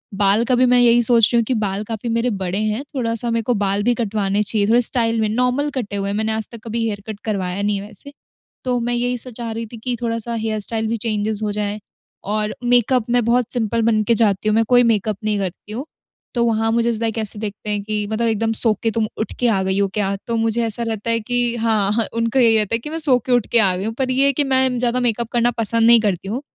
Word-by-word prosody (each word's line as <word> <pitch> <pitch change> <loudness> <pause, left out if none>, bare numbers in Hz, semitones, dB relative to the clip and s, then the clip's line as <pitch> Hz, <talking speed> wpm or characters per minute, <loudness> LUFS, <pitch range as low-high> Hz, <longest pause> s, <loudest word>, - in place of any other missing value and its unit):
बाल 205 +3 +3
का 255 - +2
भी 255 +1 +4
मैं 250 - +5
यही 240 0 +5
सोच 230 -2 +5
रही - - +4
हूँ - - +2
कि 255 - -1
बाल 200 0 -2
काफ़ी 225 +2 -5
मेरे 230 +2 0
बड़े 190 -2 -3
हैं, 215 +5 -1
थोड़ा-सा 235 -1 -1
मेरे 230 -1 0
को 245 - 0
बाल 200 +1 +1
भी 240 +1 +3
कटवाने 210 -3 -1
चाहिए, 210 -1 +1
थोड़े 235 +2 +4
स्टाइल 230 -2 +1
में, 215 - +1
नॉर्मल 250 +5 0
कटे 215 -6 -3
हुए 200 0 -2
हैं, 200 - -2
मैंने 220 0 0
आज 220 -1 -2
तक 230 - -10
कभी 230 +1 -2
हेयर 205 -2 -3
कट 215 -2 -6
करवाया 195 -3 -2
नहीं 205 0 0
है 200 - -8
वैसे। 250 +7 -12 0.5
तो 250 -1 0
मैं 240 +1 -2
यही 245 +1 -1
सब 250 +2 -6
चाह 230 -1 -4
रही 225 +1 -4
थी 235 - -8
कि 245 +2 -2
थोड़ा-सा 230 0 -2
हेयर 220 -1 -2
स्टाइल 220 +1 -3
भी 230 - -1
चेंजज़ 215 -1 -2
हो 210 - -1
जाए। 210 0 -3 0.5
और 215 0 -1
मेकअप 245 0 +3
मैं 245 -1 +3
बहुत 240 0 +1
सिंपल 230 -1 0
बन 215 -2 +2
के 230 - +5
जाती 215 -1 +1
हूँ, 215 - +2
मैं 225 - +4
कोई 245 0 +6
मेकअप 215 -3 0
नहीं 210 -1 0
करती 190 +2 -6
हूँ। 260 +6 -5 0.5
तो 235 0 +2
वहाँ 225 0 +1
मुझे 235 +1 +1
इज़ 225 -1 -2
लाइक 225 0 -2
ऐसे 210 -1 -2
देखते 210 0 -5
हैं 205 -1 0
कि 210 -1 -2
मतलब 230 +1 0
एकदम 225 0 0
सो 225 -3 +5
के 225 - +1
तुम 220 0 -1
उठ 220 - -3
के 245 - +2
आ 200 -5 +2
गयी 190 +1 0
हो 200 - +2
क्या? 200 -2 0
तो 230 - -1
मुझे 225 +1 0
ऐसा 225 +1 -3
लगता 225 0 -3
है 230 - +1
कि 240 +1 -1
हाँ, 220 -1 +1
उनको 230 +3 0
यही 225 -2 +5
होता 210 +2 0
है 230 - -2
कि 300 - -8
मैं 320 - -4
सो 275 -6 +3
के 255 - -2
उठ 245 -4 +2
के 235 - +5
आ 190 -4 +3
गयी 195 - -3
हूँ, 225 - -2
पर 260 -1 -1
ये 270 +2 +3
है 280 - +3
कि 290 - +1
मैं 260 -2 +1
ज़्यादा 245 0 0
मेकअप 235 -1 -1
करना 240 0 +2
पसंद 230 +1 +4
नहीं 235 -1 +7
करती 195 -3 -2
हूँ। 245 +5 -3
225 Hz, 270 wpm, -20 LUFS, 210-240 Hz, 0.5 s, नहीं